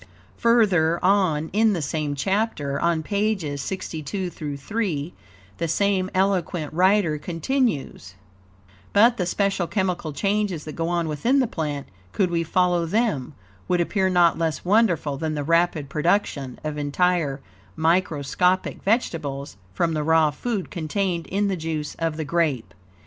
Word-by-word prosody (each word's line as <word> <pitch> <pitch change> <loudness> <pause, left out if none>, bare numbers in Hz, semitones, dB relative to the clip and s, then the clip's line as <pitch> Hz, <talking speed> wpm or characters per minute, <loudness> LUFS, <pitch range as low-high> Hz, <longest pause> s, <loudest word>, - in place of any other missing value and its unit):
Further 195 -9 +3
on 180 -6 +2
in 220 +1 +4
the 175 - -2
same 145 0 -2
chapter, 170 -5 -1
on 170 -2 +1
pages 200 -8 -1
62 175 +2 -4
3, 155 +2 -3 0.5
the 165 - 0
same 190 +2 +1
eloquent 185 -5 0
writer 180 -3 +3
continues: 165 - -2 0.8
"But 230 +4 +5
the 180 - -1
special 195 -2 0
chemical 180 -5 -1
changes 195 0 -1
that 155 - -6
go 165 0 -2
on 170 -1 0
within 195 - +1
the 265 - +4
plant, 150 - -3 0.3
could 185 -3 +1
we 170 -1 +1
follow 175 0 +1
them, 170 - 0 0.3
would 180 - +1
appear 190 +2 +1
not 175 -2 +4
less 160 0 -1
wonderful 175 -8 +2
than 155 +1 -2
the 145 - -2
rapid 165 -1 +1
production 150 -4 0
of 150 -1 -3
entire 145 -1 +1 0.4
microscopic 170 - +1
vegetables 150 - -1
from 165 - 0
the 155 - -1
raw 160 0 +3
food 205 +4 -3
contained 175 0 -2
in 200 +2 0
the 195 - 0
juice 160 -3 -4
of 165 -2 -1
the 160 - -3
grape. 150 -6 0
170 Hz, 140 wpm, -24 LUFS, 150-195 Hz, 0.8 s, But